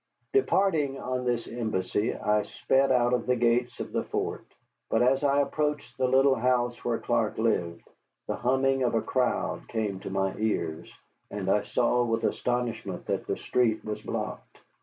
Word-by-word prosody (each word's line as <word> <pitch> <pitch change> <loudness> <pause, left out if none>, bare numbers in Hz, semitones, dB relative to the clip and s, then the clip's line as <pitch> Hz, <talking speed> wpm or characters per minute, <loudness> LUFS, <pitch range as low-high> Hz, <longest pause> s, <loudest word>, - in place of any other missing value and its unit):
Departing 165 - +2
on 125 0 -3
this 120 -1 -1
embassy, 110 -2 -1
I 105 0 +1
sped 135 +5 +1
out 125 -1 +3
of 125 -1 0
the 125 - +3
gates 120 +1 +1
of - - -5
the - - -1
fort. - - -3 0.4
But, 110 - +3
as 135 +3 +3
I 140 0 +4
approached 150 +1 -2
the 130 -1 +1
little 135 +2 +5
house 120 -1 0
where 120 -1 0
Clark - - 0
lived, 85 -1 -1 0.4
the - - -2
humming 135 +2 +2
of 120 -2 +1
a 115 - +2
crowd 130 -1 -1
came 105 -4 -2
to - - -7
my 95 0 0
ears, 85 -6 -2 0.4
and 95 -2 -2
I 105 - +3
saw 125 0 +1
with 115 -1 -1
astonishment 120 0 -2
that - - -2
the - - -1
street 115 -3 0
was 105 -1 -4
blocked. - - -5
120 Hz, 170 wpm, -28 LUFS, 110-130 Hz, 0.4 s, little